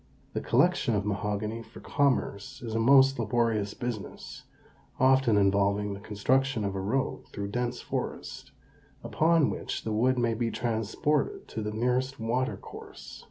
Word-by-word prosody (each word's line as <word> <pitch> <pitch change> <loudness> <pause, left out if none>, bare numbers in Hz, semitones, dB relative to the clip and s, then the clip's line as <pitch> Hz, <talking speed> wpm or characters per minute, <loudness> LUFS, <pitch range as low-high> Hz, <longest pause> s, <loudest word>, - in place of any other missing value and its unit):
The - - -2
collection 115 - +2
of 100 -1 -1
mahogany 105 +2 -2
for 115 +1 -13
commerce 130 -3 -1
is 115 -2 -4
a 115 - 0
most 135 +2 +5
laborious 110 -2 0
business, 120 -4 -6 0.5
often 130 -4 +4
involving 100 +1 +2
the 100 - -7
construction 115 +3 0
of 100 - -2
a 95 - -3
road 130 +8 -2
through 100 - -5
a - - -5
dense 120 +3 -2
forest, - - -5 0.5
upon 165 -1 +3
which - - -4
the 110 - -2
wood 125 +4 +2
may 120 -1 +1
be 115 +1 -1
transported 120 - -1
to 110 - -4
the 105 - -2
nearest 125 +4 -1
water 120 +3 -1
course. - - -11
115 Hz, 155 wpm, -28 LUFS, 105-130 Hz, 0.5 s, most